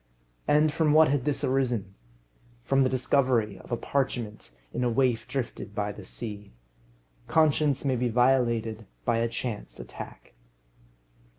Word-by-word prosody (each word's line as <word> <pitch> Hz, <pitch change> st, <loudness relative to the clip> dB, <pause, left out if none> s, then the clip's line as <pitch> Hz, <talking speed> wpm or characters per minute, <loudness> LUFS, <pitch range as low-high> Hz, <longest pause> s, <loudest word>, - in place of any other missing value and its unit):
And 150 Hz, +1 st, +4 dB
from 155 Hz, -1 st, +2 dB
what 155 Hz, -1 st, +6 dB
had 140 Hz, -2 st, 0 dB
this 145 Hz, -1 st, -1 dB
arisen? 125 Hz, -7 st, 0 dB, 0.7 s
From 135 Hz, +1 st, +2 dB
the 130 Hz, -, +3 dB
discovery 125 Hz, -6 st, +1 dB
of -, -, -14 dB
a 120 Hz, -, +1 dB
parchment 120 Hz, -, -2 dB, 0.2 s
in -, -, -1 dB
a 125 Hz, -, +2 dB
waif 120 Hz, -1 st, +1 dB
drifted 125 Hz, -5 st, -4 dB
by 105 Hz, 0 st, -1 dB
the 105 Hz, 0 st, -10 dB
sea. 105 Hz, -, -7 dB, 0.7 s
Conscience 150 Hz, -3 st, +2 dB
may 135 Hz, -2 st, +2 dB
be 125 Hz, 0 st, 0 dB
violated 115 Hz, -3 st, +2 dB, 0.2 s
by 115 Hz, -, +2 dB
a 115 Hz, -, +1 dB
chance 115 Hz, -, -5 dB
attack. -, -, -10 dB
125 Hz, 140 wpm, -27 LUFS, 110-135 Hz, 0.7 s, what